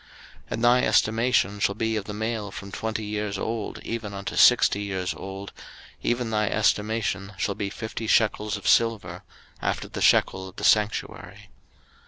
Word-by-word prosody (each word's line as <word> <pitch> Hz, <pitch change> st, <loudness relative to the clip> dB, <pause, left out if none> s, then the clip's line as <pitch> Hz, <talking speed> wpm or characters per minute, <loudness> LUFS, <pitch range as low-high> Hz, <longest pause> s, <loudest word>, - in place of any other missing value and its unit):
03:027:003 -, -, -24 dB, 0.4 s
And 115 Hz, -, -3 dB
thy 120 Hz, +1 st, +5 dB
estimation 110 Hz, -4 st, +2 dB
shall 100 Hz, 0 st, +1 dB
be 110 Hz, +1 st, -1 dB
of 105 Hz, -2 st, -3 dB
the 105 Hz, -, -6 dB
male 110 Hz, -1 st, -3 dB
from 100 Hz, 0 st, -9 dB
twenty 110 Hz, +1 st, -3 dB
years 105 Hz, -1 st, -3 dB
old 110 Hz, +1 st, -3 dB
even 110 Hz, -3 st, -5 dB
unto 100 Hz, -, -5 dB
sixty 100 Hz, -, +5 dB
years 95 Hz, -3 st, -2 dB
old, 95 Hz, 0 st, -8 dB, 0.5 s
even 120 Hz, -1 st, -1 dB
thy 105 Hz, -1 st, +1 dB
estimation 105 Hz, -2 st, 0 dB
shall 100 Hz, -, -1 dB
be 100 Hz, 0 st, -3 dB
fifty 110 Hz, +1 st, -6 dB
shekels 105 Hz, -1 st, +2 dB
of 100 Hz, -, -7 dB
silver, 100 Hz, -6 st, +2 dB, 0.4 s
after -, -, -2 dB
the -, -, -6 dB
shekel 95 Hz, 0 st, +3 dB
of 95 Hz, -, -17 dB
the -, -, -8 dB
sanctuary. 105 Hz, -, 0 dB
105 Hz, 165 wpm, -25 LUFS, 100-110 Hz, 0.5 s, thy